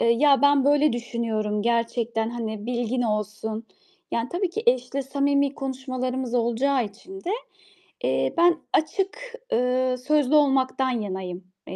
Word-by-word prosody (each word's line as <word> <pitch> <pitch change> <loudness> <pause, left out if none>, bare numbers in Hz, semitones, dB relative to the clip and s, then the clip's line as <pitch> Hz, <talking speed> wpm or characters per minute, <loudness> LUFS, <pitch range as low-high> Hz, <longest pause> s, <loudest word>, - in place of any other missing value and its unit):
eee, 230 - +4
"Ya, 275 +3 +4
ben 285 -1 +5
böyle 290 0 +4
düşünüyorum 225 -3 -2
gerçekten 230 -1 0
hani 220 -2 -5
bilgin 245 0 -1
olsun." 215 0 -2 0.5
Yani 230 +1 -1
tabii 360 +1 -1
ki 440 +5 -3
eşle 255 +2 +2
samimi 280 +1 +1
konuşmalarımız 255 -2 -3
olacağı 245 +2 +2
için 355 - -11
de, 360 - -2 0.7
eee, - - +1
ben 340 0 +5 0.2
açık, 420 +9 -1 0.2
eee, 255 +1 +2
sözlü 300 -1 +3
olmaktan 265 -2 +3
yanayım, 190 -6 -4 0.2
eee, - - -6
255 Hz, 135 wpm, -25 LUFS, 230-280 Hz, 0.7 s, ben